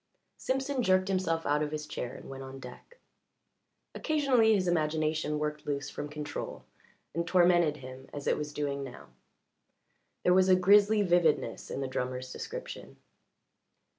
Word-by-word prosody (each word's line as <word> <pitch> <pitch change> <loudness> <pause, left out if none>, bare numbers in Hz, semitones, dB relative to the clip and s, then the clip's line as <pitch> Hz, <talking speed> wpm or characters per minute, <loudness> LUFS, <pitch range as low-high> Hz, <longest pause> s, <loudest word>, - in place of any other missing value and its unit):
Simpson 270 0 -1
jerked 185 -3 +3
himself 170 -4 0
out 150 +1 +2
of 150 - -1
his 150 -1 -4
chair 130 -4 -5
and - - -11
went 135 0 -8
on 135 0 -8
deck. 125 - -12 1.0
Occasionally 260 -8 +3
his 185 -2 0
imagination 155 -2 0
worked 150 0 -3
loose 140 -1 -2
from 150 - -5
control 150 0 -6 0.5
and 170 +1 -2
tormented 175 -4 +4
him 130 0 -11
as 145 -1 -7
it - - +2
was 150 -1 -4
doing 140 -1 -2
now. 130 -2 -10 1.1
There 180 - +4
was 185 0 +4
a 185 - +7
grizzly 205 +3 +5
vividness 175 -4 +1
in - - -4
the 135 - -2
drummer's 130 0 -4
description. - - -7
155 Hz, 150 wpm, -30 LUFS, 145-185 Hz, 1.1 s, a